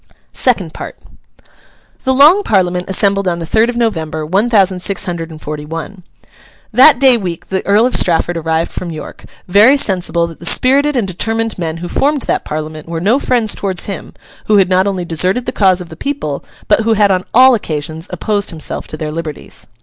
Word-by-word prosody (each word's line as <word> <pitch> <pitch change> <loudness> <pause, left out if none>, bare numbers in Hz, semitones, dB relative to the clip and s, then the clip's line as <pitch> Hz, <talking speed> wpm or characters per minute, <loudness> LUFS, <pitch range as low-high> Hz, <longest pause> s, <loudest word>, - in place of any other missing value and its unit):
SECOND 200 -11 0
PART - - -8 1.1
The 260 - +2
Long 295 +9 +6
Parliament 180 - 0
assembled 195 0 +2
on 175 -1 0
the 170 - -5
third 220 +7 +2
of 240 - -3
November, 160 -9 -2
one 195 +9 +1
thousand 195 -5 +3
six 200 +1 0
hundred 170 -2 -4
and 160 -1 -11
forty 150 -1 -6
one. 165 +5 -7 0.7
That 265 +5 +7
day 260 -3 +5
week 180 -6 -6
the 190 0 -2
Earl 210 +3 +4
of 255 - -1
Strafford 175 0 +1
arrived 160 0 -1
from 180 - -5
York, 160 -2 -9 0.2
very 210 +9 +5
sensible 180 -7 0
that 165 -1 -10
the 170 - -10
spirited 280 +6 +2
and 220 -5 0
determined 225 +4 -2
men 165 -2 -3
who 175 +1 -6
formed 285 +7 0
that - - -1
Parliament 155 +1 -6
were 165 -1 -3
no 215 +10 +2
friends 240 -6 +1
towards 190 -3 -2
him, 195 - -7 0.3
who 215 - +4
had 190 -2 +3
not 185 +1 +2
only 190 -3 -2
deserted 180 +9 0
the - - -2
cause 190 -3 +2
of 175 - -9
the 160 - -10
people, 165 - -4 0.2
but - - +3
who 225 0 +1
had 205 -2 +3
on 185 -1 0
all 260 +2 +6
occasions 160 -5 -4
opposed 205 -2 -1
himself 160 -4 -5
to 155 - -7
their 155 0 -4
liberties. 155 -2 -7
190 Hz, 200 wpm, -14 LUFS, 165-225 Hz, 1.1 s, That